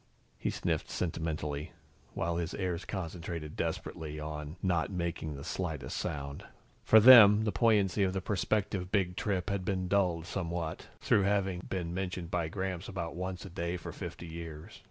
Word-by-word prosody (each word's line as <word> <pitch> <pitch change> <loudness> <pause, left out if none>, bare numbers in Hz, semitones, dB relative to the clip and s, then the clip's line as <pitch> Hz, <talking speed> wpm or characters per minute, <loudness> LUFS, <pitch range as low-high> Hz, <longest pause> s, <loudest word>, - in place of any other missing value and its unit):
He - - -1
sniffed - - -1
sentimentally, 80 -2 -3 0.4
while 85 0 -1
his 85 -2 -2
heirs 90 -2 -2
concentrated 85 -4 -5
desperately 75 -1 -3
on 75 0 -5
not 85 -4 +1
making 85 -5 -3
the 70 - -7
slightest 80 -5 -3
sound. 70 -4 -4 0.4
For 110 - +7
them, 110 -3 +10
the 110 - +1
poignancy 105 -2 +3
of 95 -1 +3
the 95 - 0
prospective 100 -1 -1
Big 95 -4 +1
Trip 100 -1 -1
had 100 -2 -1
been 95 -1 -1
dulled 90 -4 +1
somewhat, 85 -3 -3
through - - +4
having 100 -2 +1
been 85 -3 -2
mentioned 90 -2 -3
by 85 -3 0
Gramps 95 +1 -3
about 85 -4 -4
once 90 0 -4
a - - -7
day 85 +1 -2
for 85 - -7
fifty - - -7
years. 80 -2 -8
90 Hz, 160 wpm, -31 LUFS, 80-95 Hz, 0.4 s, them